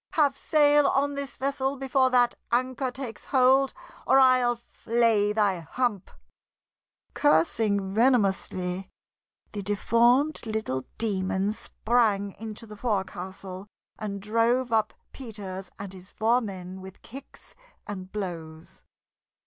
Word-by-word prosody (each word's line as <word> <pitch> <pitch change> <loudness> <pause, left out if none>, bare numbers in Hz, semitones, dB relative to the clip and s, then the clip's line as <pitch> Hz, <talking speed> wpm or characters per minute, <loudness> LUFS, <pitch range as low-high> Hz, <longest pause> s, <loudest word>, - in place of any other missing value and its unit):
Have 290 -4 +3
sail 295 0 +4
on 285 +1 +1
this 280 -1 -5
vessel 275 0 -1
before 265 0 +2
that 245 -1 +3 0.2
anchor 255 +2 0
takes 250 -3 -7
hold, 265 +1 +4 0.4
or - - +5
I'll 255 -2 +5
flay 230 -3 +1
thy 205 -4 +1
hump!" 205 +4 -2 1.0
Cursing 200 - +2
venomously, 195 -5 +1 0.6
the 205 - -5
deformed 235 +8 +2
little 215 -13 -2
demon 195 -1 0
sprang 215 -3 +1
into 220 +1 -7
the 210 -1 -11
forecastle 190 -3 -4 0.3
and 205 -2 -4
drove 230 +4 +1
up 220 -1 +1 0.2
Peters 195 -7 -7
and 195 -1 -7
his 185 0 -11
four 235 +3 +2
men 190 -3 -7
with 190 0 -12
kicks 270 +4 -12 0.3
and 190 -3 -7
blows. 165 -6 -7
220 Hz, 115 wpm, -27 LUFS, 195-255 Hz, 1.0 s, or